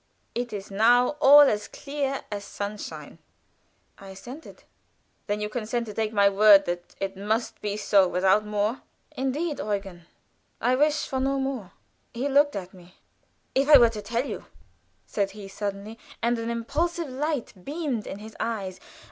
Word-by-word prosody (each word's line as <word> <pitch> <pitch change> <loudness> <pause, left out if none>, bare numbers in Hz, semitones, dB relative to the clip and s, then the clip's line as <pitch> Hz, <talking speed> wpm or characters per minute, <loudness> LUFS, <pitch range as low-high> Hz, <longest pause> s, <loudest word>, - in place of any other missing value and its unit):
It 245 0 -3
is 205 -1 -7
now 240 +5 +4
all 290 +2 +9
as 215 -7 +3
clear 275 -1 -4
as 205 -1 -4
sunshine." 205 +1 -7 0.8
I 195 - -12
assented. 245 +11 -11 0.6
"Then 205 0 -1
you 210 - -1
consent 235 +1 -3
to 210 - -8
take 220 0 -1
my 200 -2 +4
word 200 0 +7
that 175 0 -5
it 195 0 -3
must 215 +4 -2
be 205 0 -2
so, 200 -3 +4
without 190 +4 +3
more." 210 +3 -1 0.3
"Indeed, 290 +4 -2
Eugen, 195 -5 -4 0.5
I 245 +2 +2
wish 300 +3 +2
for 265 - -2
no 270 +1 0
more." 265 -8 -3 0.4
He 255 +4 -1
looked 285 +1 +3
at 185 -1 -6
me. 180 0 -17 0.6
"If 275 +2 +1
I 295 - +11
were 240 -2 +6
to 215 -2 -6
tell 235 +4 -2
you," - - -6 0.6
said 200 -2 -1
he, 200 -2 -8
suddenly, 200 +2 -5 0.2
and 235 0 0
an 230 0 -3
impulsive 315 +9 -1
light 280 0 -3
beamed 285 - -3
in - - -6
his 215 +1 -11
eyes. 200 -5 -3
220 Hz, 165 wpm, -26 LUFS, 200-265 Hz, 0.8 s, I